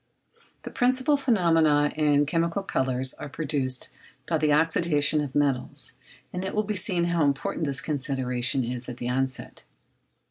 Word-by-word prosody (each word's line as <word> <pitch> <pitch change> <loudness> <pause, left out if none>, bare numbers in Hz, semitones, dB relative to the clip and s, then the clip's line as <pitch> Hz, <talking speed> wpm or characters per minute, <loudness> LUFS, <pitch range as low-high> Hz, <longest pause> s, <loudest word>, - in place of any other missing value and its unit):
The - - -7
principal 255 +3 +2
phenomena 165 - +3
in 145 -1 +3
chemical 165 +5 -1
colours 130 -6 +1
are 150 - -8
produced 135 -4 -2 0.3
by - - 0
the 155 - +1
oxydation 155 -1 +2
of 135 -2 -7
metals, 140 -4 0 0.4
and 180 - -3
it 190 - -4
will 215 - +2
be 210 +1 -2
seen 185 -2 0
how 170 -2 +1
important 145 +2 -1
this 140 +2 -1
consideration 130 -4 -1
is 125 +1 -4
at 125 - -7
the 120 - -4
outset. 130 +1 -3
150 Hz, 150 wpm, -26 LUFS, 130-170 Hz, 0.4 s, phenomena